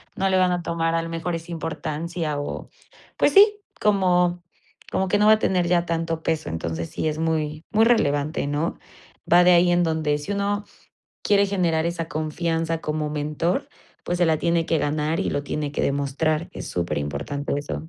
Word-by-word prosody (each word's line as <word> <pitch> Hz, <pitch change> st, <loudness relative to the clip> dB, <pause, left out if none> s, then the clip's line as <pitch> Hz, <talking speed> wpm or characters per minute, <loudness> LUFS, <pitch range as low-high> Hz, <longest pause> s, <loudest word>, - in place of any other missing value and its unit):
No 195 Hz, 0 st, 0 dB
le 190 Hz, -, +3 dB
van 185 Hz, -1 st, +3 dB
a 175 Hz, -1 st, -1 dB
tomar 165 Hz, 0 st, -1 dB
a 165 Hz, -, +1 dB
lo 165 Hz, -, -6 dB
mejor 165 Hz, +1 st, -3 dB
esa 165 Hz, +1 st, -5 dB
importancia 165 Hz, -1 st, -3 dB
o 145 Hz, -, -5 dB, 0.5 s
pues -, -, +3 dB
sí, 415 Hz, +1 st, +7 dB, 0.2 s
como 180 Hz, -4 st, +2 dB, 0.5 s
como 190 Hz, -, 0 dB
que 205 Hz, +3 st, +2 dB
no 210 Hz, -, +3 dB
va 215 Hz, -, +7 dB
a 215 Hz, -, +2 dB
tener 180 Hz, -4 st, +1 dB
ya 175 Hz, 0 st, +2 dB
tanto 165 Hz, -1 st, -2 dB
peso. 160 Hz, -1 st, -1 dB
Entonces 80 Hz, 0 st, -3 dB
sí, -, -, -2 dB
es 155 Hz, 0 st, -2 dB
muy, 155 Hz, -1 st, -2 dB
muy 220 Hz, 0 st, +4 dB
relevante, 150 Hz, -12 st, +2 dB
¿no? 145 Hz, +4 st, -2 dB, 0.5 s
Va 175 Hz, +1 st, +7 dB
de 180 Hz, -, +6 dB
ahí 175 Hz, 0 st, +5 dB
en 175 Hz, 0 st, +3 dB
donde 160 Hz, -3 st, 0 dB
si 150 Hz, +8 st, -5 dB
uno, 205 Hz, +1 st, -1 dB, 0.6 s
quiere 200 Hz, -1 st, +3 dB
generar 175 Hz, -5 st, +1 dB
esa 170 Hz, -1 st, -2 dB
confianza 165 Hz, +1 st, -2 dB
como 150 Hz, 0 st, -2 dB
mentor, 150 Hz, +4 st, -1 dB, 0.4 s
pues 175 Hz, 0 st, -2 dB
se 175 Hz, -, +4 dB
la 160 Hz, -1 st, +3 dB
tiene 170 Hz, 0 st, +1 dB
que 165 Hz, -, +1 dB
ganar 150 Hz, +2 st, -1 dB
y -, -, -1 dB
lo 145 Hz, -, -1 dB
tiene 145 Hz, 0 st, -3 dB
que -, -, -2 dB
demostrar. 150 Hz, +4 st, 0 dB
Es -, -, -7 dB
superimportante 75 Hz, -, -3 dB
eso. 145 Hz, +2 st, -6 dB
165 Hz, 190 wpm, -23 LUFS, 150-175 Hz, 0.6 s, sí